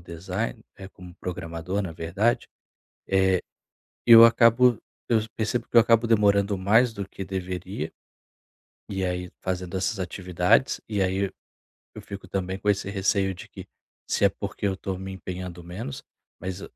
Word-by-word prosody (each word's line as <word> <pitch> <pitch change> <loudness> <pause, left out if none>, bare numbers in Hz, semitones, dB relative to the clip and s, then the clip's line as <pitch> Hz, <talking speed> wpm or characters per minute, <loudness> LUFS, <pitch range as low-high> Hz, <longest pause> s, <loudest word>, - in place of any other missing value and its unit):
design 85 -7 -5
eh, 95 -1 -9
como 90 -2 -13
programador, 90 +2 -4
na 90 -4 -5
verdade, 95 +8 0 1.6
é, 120 - +7
eu 115 0 +12
acabo 115 0 +5 0.3
eu 115 - +4 0.2
percebo 110 +1 -1
que - - -2
eu - - +11
acabo 115 0 +3
demorando 100 -2 +3
mais 115 +6 +4
do 100 -3 -5
que 95 - -7
deveria, 95 -2 -4 1.0
e 95 -1 -2
aí 90 0 -3
fazendo 90 -1 -3
essas 100 +3 -1
atividades, 90 +5 +1
e 105 -3 0
aí 95 +1 0 0.7
eu - - -8
fico 100 -2 -9
também 95 0 -3
com 105 - 0
esse 100 -1 0
receio 95 -1 +1
de 90 - -11
que - - -10 0.4
se - - 0
é - - +7
porque 100 - -4
eu 95 - 0
estou 95 -1 -5
me 95 0 -6
empenhando 90 -2 -7
menos, 90 -4 -7 0.4
mas 95 +1 -5
95 Hz, 155 wpm, -25 LUFS, 90-105 Hz, 1.6 s, eu